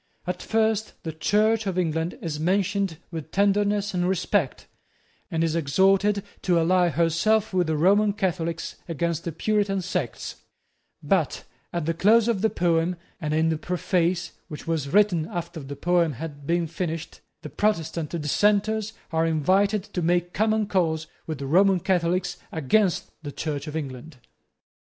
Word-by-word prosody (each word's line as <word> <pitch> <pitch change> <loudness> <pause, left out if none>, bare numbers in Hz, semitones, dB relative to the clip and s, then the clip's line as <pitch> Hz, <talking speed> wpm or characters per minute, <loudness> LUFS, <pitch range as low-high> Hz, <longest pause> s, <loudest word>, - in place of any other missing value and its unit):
At 180 0 -3
first 220 -1 0
the 160 - -4
Church 210 +7 +2
of 185 -2 -2
England 165 -1 -1
is 155 -3 -3
mentioned 195 +1 0
with 160 -2 -6
tenderness 205 +1 +1
and 180 0 +1
respect, 190 -5 0 0.6
and 165 0 0
is 165 -1 0
exhorted 195 +6 +3 0.2
to 180 -2 +2
ally 180 +1 +3
herself 170 +8 +2
with 180 -2 +2
the 160 -1 0
Roman 200 +6 +4
Catholics 170 -4 -2
against 170 0 -2
the 170 - -2
Puritan 200 +3 0
sects: 185 - -3 0.7
but - - +1 0.3
at 170 -3 -2
the 165 - +1
close 215 +7 +4
of 225 -5 +1
the 220 - +3
poem, 170 -1 +1 0.2
and 155 -4 -3
in 160 +1 +2
the 160 -1 -1
preface, 175 0 0 0.2
which 150 -4 -8
was 160 -4 -1
written 180 -3 +3
after 170 -2 -5
the 140 -1 -7
poem 170 +1 +2
had 145 0 -8
been 170 0 +1
finished, 165 0 -4 0.2
the - - -6
Protestant 165 -6 -1
Dissenters 205 +7 +1 0.2
are 165 0 +2
invited 190 +6 +2
to 200 -3 -4
make 175 +1 +1
common 215 +1 +2
cause 165 -5 0 0.2
with 160 -2 -3
the 140 - -5
Roman 185 +6 +4
Catholics 180 +1 0
against 175 +5 +1
the 145 -2 -6
Church 145 0 -4
of 150 - -6
England. 135 -1 -6
175 Hz, 155 wpm, -25 LUFS, 160-200 Hz, 0.7 s, Roman